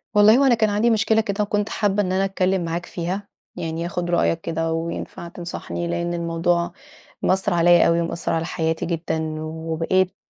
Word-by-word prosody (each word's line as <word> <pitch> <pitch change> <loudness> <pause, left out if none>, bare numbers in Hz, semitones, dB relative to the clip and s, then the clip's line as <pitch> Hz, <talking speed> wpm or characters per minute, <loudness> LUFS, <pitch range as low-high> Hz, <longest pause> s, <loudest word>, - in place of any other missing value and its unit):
والله 210 +3 +7
هو 275 - +4
أنا 250 - +5
كان 220 -2 +2
عندي 210 +3 +2
مشكلة 220 0 +3
كده 210 0 -1
وكنت 205 0 -1
حابة 205 -1 +1
إن 185 - -2
أنا 190 +1 +2
أتكلم 190 -2 0
معاك 170 +1 -3
فيها، 185 +4 -4 0.3
يعني 165 -1 -3
آخد 175 0 -3
رأيك 170 -1 +1
كده 165 0 -2
وينفع 165 +1 -4
تنصحني، 170 0 -5
لأن 170 0 -2
الموضوع 170 +1 0 0.5
مأثر 190 +1 +1
عليَّ 175 0 +5
أوي، 170 0 +3
ومأثر 170 0 -2
على 165 0 0
حياتي 160 -1 -1
جدًا، 160 -2 -2
وبقيت 165 +4 -1
175 Hz, 175 wpm, -22 LUFS, 165-195 Hz, 0.5 s, والله